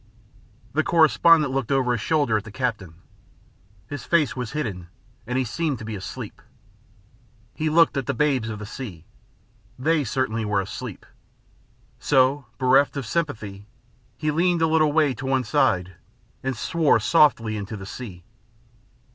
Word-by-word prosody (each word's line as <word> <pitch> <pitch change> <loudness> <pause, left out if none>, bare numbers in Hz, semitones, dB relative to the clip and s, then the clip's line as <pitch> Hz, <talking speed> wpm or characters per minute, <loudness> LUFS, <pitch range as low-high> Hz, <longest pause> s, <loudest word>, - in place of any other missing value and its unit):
The 155 +3 +2
correspondent 155 -1 +4
looked 135 -2 -2
over 130 -2 +2
his 120 -3 -1
shoulder 145 -7 +1
at 105 - 0
the 110 - -11
captain. 105 -9 -3 0.9
His 145 +5 -7
face 155 -7 +2
was 125 -1 -5
hidden, 105 - -4 0.4
and 125 +1 -1
he 130 - +2
seemed 145 +4 -2
to 110 - -9
be 110 -1 -5
asleep. 95 - -8 1.1
He 155 0 -1
looked 165 +1 +4
at 135 -3 -2
the - - -1
babes 130 -4 +1
of 105 - -5
the 105 - -7
sea. 100 -7 -8 0.7
They 155 +4 +1
certainly 115 -2 -1
were 105 -1 0
asleep. 105 +2 -6 0.9
So, 135 0 +2
being 130 -1 +1
bereft 140 +2 +4
of 135 - -3
sympathy, 105 -9 -3 0.5
he 155 0 -1
leaned 170 +1 +2
a - - +4
little 155 -1 +3
way 150 -3 +3
to 130 +2 -7
one 135 -1 +1
side 90 - +1 0.5
and 130 -2 -3
swore 155 +2 +2
softly 115 -4 +3
into 105 +1 -5
the 95 - -8
sea. 95 -4 -8
130 Hz, 155 wpm, -24 LUFS, 110-150 Hz, 1.1 s, correspondent